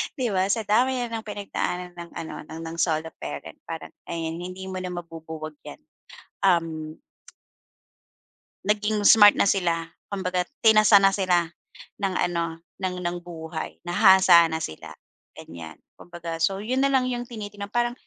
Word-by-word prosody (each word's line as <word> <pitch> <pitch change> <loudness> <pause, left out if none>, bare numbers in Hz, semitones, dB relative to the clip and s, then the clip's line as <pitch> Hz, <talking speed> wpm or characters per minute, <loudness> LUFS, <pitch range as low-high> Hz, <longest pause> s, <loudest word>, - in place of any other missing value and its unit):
'di 260 -5 -1
ba? 185 -1 +2
Sa 225 +2 0
dami 245 +6 +3
na 245 - -2
ng 225 - -6
pinagdaanan 180 -3 -3
ng 170 0 -8
ano, 160 - -6
ng 160 +1 -8
ng 165 +1 -6
solo 160 -1 0
parent 75 -1 -7
parang, - - -6 0.2
ayan, 165 -1 -3
hindi 185 +1 -7
mo 190 0 -4
na 185 - -4
mabubuwag 160 -2 -7
'yan. - - -10 0.6
Uhm 165 -4 +1 1.7
Naging 210 +1 0
smart 205 0 +8
na - - +3
sila 175 -4 +1 0.2
kumbaga 180 -2 -2 0.2
tinasa 215 -1 +7
na 195 - +6
sila 180 -4 +1 0.5
ng 195 -2 0
ano, 170 -1 -1 0.2
ng 185 -1 -2
ng 175 0 -1
buhay, 160 -2 -7
nahasa 175 -1 +6
na 160 0 -3
sila 80 - -7 0.4
ganiyan. 80 -2 -10 0.2
Kumbaga 170 -1 -7
so 195 +4 +1
'yon 255 +4 -1
na 275 - +4
lang 265 -2 +2
'yong 245 0 -3
tinitignan 205 -3 -7
parang, 240 +3 0
180 Hz, 155 wpm, -25 LUFS, 165-205 Hz, 1.7 s, smart